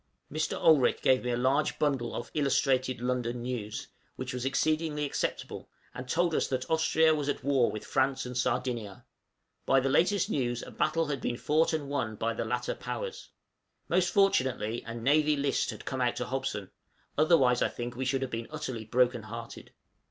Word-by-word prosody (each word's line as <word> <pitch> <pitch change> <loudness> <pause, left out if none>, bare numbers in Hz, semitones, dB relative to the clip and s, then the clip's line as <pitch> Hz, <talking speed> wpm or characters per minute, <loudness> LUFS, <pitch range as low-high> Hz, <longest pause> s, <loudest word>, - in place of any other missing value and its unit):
Mr. 155 0 -1
Olrik 150 -6 +4
gave 130 -1 +4
me 125 - -2
a 120 - 0
large 135 +4 +1
bundle 135 -6 0
of 120 - -5
'Illustrated 130 -3 +1
London 125 -1 -1
News,' 120 -4 -4 0.3
which 130 0 -5
was 125 0 -3
exceedingly 150 +2 0
acceptable, 140 - -3 0.2
and 125 0 -8
told 170 +2 +2
us - - +1
that 130 -1 -2
Austria 160 0 +4
was 145 -2 -1
at 145 - -2
war 135 -3 +3
with 110 - -6
France 135 0 +1
and 125 0 -6
Sardinia. 120 -5 -2 0.6
By 135 - +5
the 135 +1 0
latest 185 +6 +3
news 120 - -1
a - - -9
battle 165 +2 +1
had 140 -4 -3
been 120 - -2
fought 155 +5 +2
and 155 -3 -2
won 125 -6 -2
by 115 +2 -1
the - - -3
latter 120 +2 -1
Powers. - - -6 0.6
Most 180 0 +2
fortunately 130 - +2
a 115 - -5
'Navy 150 +6 +3
List' 140 -1 0
had - - -7
come 130 -1 -3
out 120 -1 +1
to 125 - -3
Hobson, 135 -7 -3 0.4
otherwise 140 -6 +4
I - - +3
think 120 0 -6
we 130 - -3
should 135 +1 0
have 130 - -4
been 115 0 -4
utterly 130 -7 -5
brokenhearted. 115 -1 -1
130 Hz, 180 wpm, -29 LUFS, 120-150 Hz, 0.6 s, By